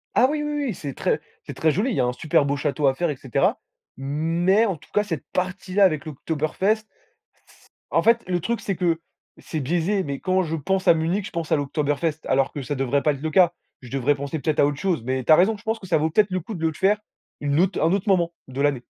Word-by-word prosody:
Ah 255 - +6
oui, 300 0 -1
oui, 295 - -2
oui, 245 - -1
c'est 140 -3 -6
très - - -1 0.2
c'est - - -7
très 160 - +2
joli. 210 - 0
Il - - -1
y - - +2
a - - +2
un 125 - +1
super 150 +2 +1
beau 140 0 0
château 140 0 0
à 135 - +4
faire, 170 +4 0
et 150 - -2
cetera. 130 -2 0 0.4
Mais 165 +9 +1
en 195 -5 -1
tout 150 - -18
cas, 210 - +3
cette 165 -8 -4
partie 185 +1 -3
là 200 0 +6
avec 155 -5 +1
l'Oktoberfest, 160 +8 -1 0.7
c - - -23 0.2
en - - +2
fait 230 +1 +4
le 180 -1 0
truc 235 +6 -1
c'est 195 - -2
que 170 -2 0 0.4
c'est 155 -3 -5
biaisé, 175 +7 0
mais 140 -1 -4
quand 185 0 +1
je 165 -1 -2
pense 190 +6 -1
à - - +9
Munich, 170 +5 -1
je - - -11
pense 170 -2 -4
à - - +5
l'Oktoberfest 145 +2 -1
alors 135 +1 +1
que 145 - -4
ça 145 +3 -3
devrait 135 +1 0
pas 150 - +3
être 140 - -9
le 160 0 -2
cas. 175 +1 +5 0.3
Je 125 - -11
devrais 135 +2 +1
penser 140 +2 -4
peut-être 155 +1 -1
à - - +6
autre 145 -1 -3
chose, 180 -9 0
mais 130 +1 -2
tu 125 - +2
as - - +10
raison, 205 +5 +3
je 205 - -18
pense 220 0 -1
que 190 - -10
ça 175 - +3
vaut 155 +1 +1
peut-être 210 +5 +3
le 185 - 0
coup 215 - -7
de 165 -2 0
le 160 - -2
faire 200 +6 +2 0.4
une 145 +1 +1
autre 190 0 0
un 160 +2 +3
autre 200 +2 -1
moment 170 -3 +2 0.2
de 130 +2 -4
l'année. 140 -4 +1
160 Hz, 270 wpm, -23 LUFS, 145-190 Hz, 0.7 s, as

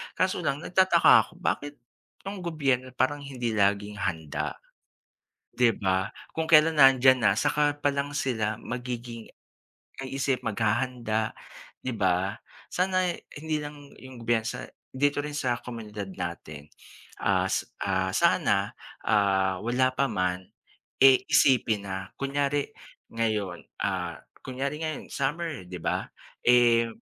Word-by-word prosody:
Kaso 185 +1 +1
lang 145 -2 -2
nagtataka 185 -2 +4 0.2
ako - - -20
bakit 145 -5 -2 0.5
itong 195 0 -6
gobyerno 140 -7 0
parang 130 +3 +1
hindi 130 -4 -4
laging 100 0 +1
handa, 80 -4 -3 1.0
'di 120 -4 +3
ba? 95 0 0 0.2
Kung 160 - 0
kailan 155 0 +5
nandiyan 130 -3 +6
na 100 - +6
saka 145 0 +2
pa 145 - +2
lang 140 0 -2
sila 110 -7 -1
magiging 120 -2 -6 0.7
kaisip, 135 0 -2
maghahanda, 115 0 -1 0.5
di 130 - -2
ba 95 0 0 0.3
sana 185 0 +1 0.3
hindi 155 +1 -2
lang 145 -1 -9
'yong 130 -3 -11
bansa, 115 -1 0 0.3
dito 145 +2 +1
rin 150 0 -5
sa 125 -4 0
komunidad 105 -4 -7
natin. 85 -4 -6 0.6
Ah, - - +2 0.7
sana, - - +2 0.3
ah, 95 -2 +2
wala 125 +3 +2
pa 140 +2 +2
man 90 -1 -1 0.6
e, 135 -1 +7
isipin 110 -6 +3
na 95 0 -5
kunyari 140 +1 -1 0.4
ngayon, 105 -6 -1 0.2
ah, - - -2 0.2
kunyari 140 +3 -3
ngayon 155 -2 -4
summer 150 - -2
'di 90 - -6
ba. - - -1 0.4
Eh, 120 -1 +5
125 Hz, 120 wpm, -27 LUFS, 105-145 Hz, 1.0 s, e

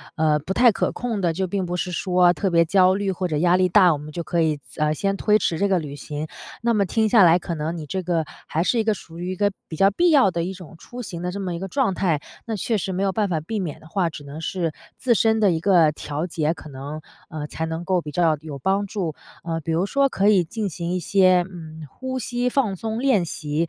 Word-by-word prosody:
呃， 155 -1 +3
不 160 +6 -4
太 240 +3 +6
可 - - -1
控 235 -4 -3
的， 170 -3 +1
就 190 +3 -1
并 190 +1 -2
不 175 0 -3
是 180 +1 -2
说 180 0 +3
特 190 +4 -1
别 170 0 +5
焦 185 +2 +4
虑 200 -1 -1
或 185 0 -2
者 155 -3 -1
压 175 +3 +4
力 185 0 +3
大， 185 -1 +6
我 - - -2
们 150 +1 -9
就 170 - -4
可 170 +1 -1
以 155 -2 +1
暂 150 - -1
呃， - - +1
先 195 +5 -1
推 210 +1 +3
迟 170 -4 0
这 200 - +2
个 190 -2 +2
旅 145 -3 -6
行。 150 +2 -5 0.3
那 235 0 +2
么 200 -2 +2
听 220 +3 +1
下 215 -3 +6
来 170 0 +6
可 170 -1 -4
能 155 +2 -3
你 155 - -6
这 185 +5 -3
个 170 -2 0 0.2
还 160 - 0
是 240 - +1
一 - - +2
个 220 0 +2
属 165 -4 -11
于 180 +1 -3
一 - - -3
个 205 +2 +1 0.2
比 160 - -7
较 195 +5 +5
必 345 - +3
要 275 -9 +6
的 170 -1 -2
一 185 +3 -3
种 180 -3 -12
出 245 +8 -9
行 175 -7 -7
的 180 - -2
这 200 - -5
么 185 -3 -3
一 - - -5
个 195 - -4
状 225 -2 0
态， 165 -7 0 0.2
那 225 - -3
确 220 +2 -1
实 190 -1 -3
没 185 - -2
有 195 - +2
办 210 +1 0
法 165 -3 0
避 210 +7 -4
免 170 -7 -4
的 155 - -16
话， 175 0 0
只 150 - -9
能 140 +2 -8
是 165 0 -2 0.3
自 245 -3 +2
身 220 0 +3
的 205 -3 +4
一 165 - 0
个 170 -3 +4
调 150 +2 -4
节， 160 -2 0
可 155 -2 -12
能， 140 +3 -7 0.3
嗯， 150 -1 -5
才 160 - -4
能 160 +1 -4
够 185 -1 +2
比 150 - -7
较 160 -1 +2
有 150 -3 -7
帮 195 +8 +1
助。 185 -7 -3 0.3
嗯， 165 -1 -2
比 165 - -1
如 165 +4 +1
说 275 +4 +3
可 200 -4 +2
以 195 -4 +5
进 210 +4 -3
行 170 0 -4
一 185 - 0
些， 185 0 +4
嗯， 160 -3 -9
呼 260 - -5
吸 245 +1 -2
放 240 -7 +1
松 220 +4 -4
练 245 -9 +2
习， 150 -2 -5
180 Hz, 295 characters per minute, -23 LUFS, 160-200 Hz, 0.3 s, 太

